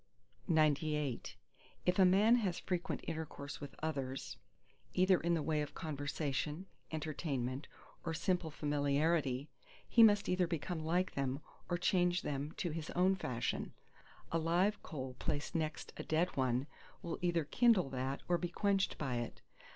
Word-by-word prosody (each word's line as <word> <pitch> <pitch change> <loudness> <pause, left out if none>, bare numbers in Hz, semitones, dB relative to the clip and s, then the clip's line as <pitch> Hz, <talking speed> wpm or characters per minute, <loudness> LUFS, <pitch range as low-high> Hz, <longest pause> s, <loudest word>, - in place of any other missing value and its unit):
XCIX 150 -4 +1 0.5
If 180 +1 +2
a 190 - +8
man 205 +6 +6
has 195 -7 0
frequent 180 -2 -2
intercourse 155 -3 -5
with 145 - -7
others, 135 -4 -3 0.6
either 185 0 +5
in 170 +1 +1
the 160 - -1
way 155 -1 +1
of 150 - -5
conversation, 150 +2 -2 0.3
entertainment, 145 -4 -2 0.4
or 165 - -2
simple 180 -1 0
familiarity, 145 -1 +1 0.4
he 235 - +5
must 205 -2 +7
either 180 -1 +2
become 165 +1 -2
like 180 +4 +1
them, 135 0 -1 0.3
or 175 - +1
change 180 0 +2
them 145 +1 -2
to 175 - -2
his 160 0 -4
own 185 +2 +4
fashion. 125 -10 -2 0.6
A 165 - +2
live 180 +6 +2
coal 130 -4 -5
placed 145 +3 -2
next 160 -2 -2
a - - -4
dead 165 +3 +1
one 130 -1 +1 0.4
will 170 - -4
either 170 -2 +2
kindle 195 - +4
that 135 +1 -2
or 175 -1 +2
be 175 - -2
quenched 195 +2 +1
by 130 -5 -1
it. 120 -1 -5
160 Hz, 150 wpm, -36 LUFS, 140-180 Hz, 0.6 s, a